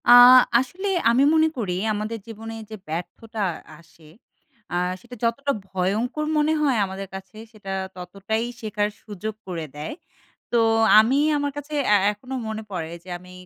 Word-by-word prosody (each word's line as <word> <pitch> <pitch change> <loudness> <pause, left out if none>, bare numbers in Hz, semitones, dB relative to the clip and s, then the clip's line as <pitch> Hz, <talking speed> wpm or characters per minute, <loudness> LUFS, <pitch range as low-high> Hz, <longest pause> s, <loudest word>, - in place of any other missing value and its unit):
আ - - +9 0.5
আসলে 355 +11 -4 0.2
আমি 245 +4 +4
মনে 320 0 +5
করি 200 -7 -2 0.2
আমাদের 215 +2 -3
জীবনে 225 0 -8 0.2
যে 220 - -6
ব্যর্থটা 210 +7 -5 0.4
আসে 165 0 -21 0.7
আ - - -2 0.3
সেটা 245 +3 -11
যতটা 275 +5 +1
ভয়ঙ্কর 205 +10 -1
মনে 300 +1 +3
হয় 275 -5 +2
আমাদের 195 +1 -6
কাছে, 190 +3 -10
সেটা 210 -3 -9 0.2
ততটাই 195 +5 -3 0.2
শেখার 210 -1 -1
সুযোগ 215 +1 -5
করে 170 -3 -4
দেয়। 150 +1 -5 0.6
তো 240 - +3 0.4
আমি 235 +5 +4 0.2
আমার 285 0 -1
কাছে 290 +1 -7 0.2
এ - - +8 0.2
এখনও 250 +6 -8
মনে 220 0 -4
পড়ে 165 -4 -4
যে 185 - -13
আমি 180 +1 -15
220 Hz, 150 wpm, -24 LUFS, 190-245 Hz, 0.7 s, আ